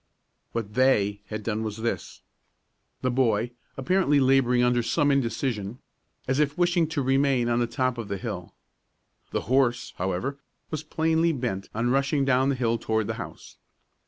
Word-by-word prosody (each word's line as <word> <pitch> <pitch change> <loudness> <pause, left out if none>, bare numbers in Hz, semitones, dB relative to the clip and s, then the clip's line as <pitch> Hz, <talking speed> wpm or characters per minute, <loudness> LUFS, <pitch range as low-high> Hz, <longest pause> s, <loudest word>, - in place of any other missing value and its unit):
What 110 -3 -3
"they" 105 -5 +2
had 110 0 -5
done 110 0 -1
was 110 -1 -4
this: 115 +1 -4 0.8
The 130 - +2
boy 120 -5 +2
was 120 - -4 0.3
apparently 145 +1 +2
laboring 130 -2 +4
under 125 0 +3
some 145 +5 +2
indecision, 120 -4 -1 0.5
as 130 +2 +1
if 150 +1 +1
wishing 175 -2 +2
to 150 -3 -2
remain 135 -2 +2
on 120 0 +2
the 120 - +1
top 125 +1 -1
of 115 - -5
the 100 - -3
hill. 95 -4 -6 0.7
The - - -2
horse, 120 -2 +1
however, 95 +10 -2 0.3
was 155 -2 -2
plainly 160 +1 +1
bent 120 -8 -3
upon 120 +3 -1
rushing 140 +1 +2
down 135 0 +3
the 140 - +1
hill 115 -2 0
toward 110 -1 0
the 110 - -2
house. - - -10
125 Hz, 165 wpm, -26 LUFS, 115-140 Hz, 0.8 s, laboring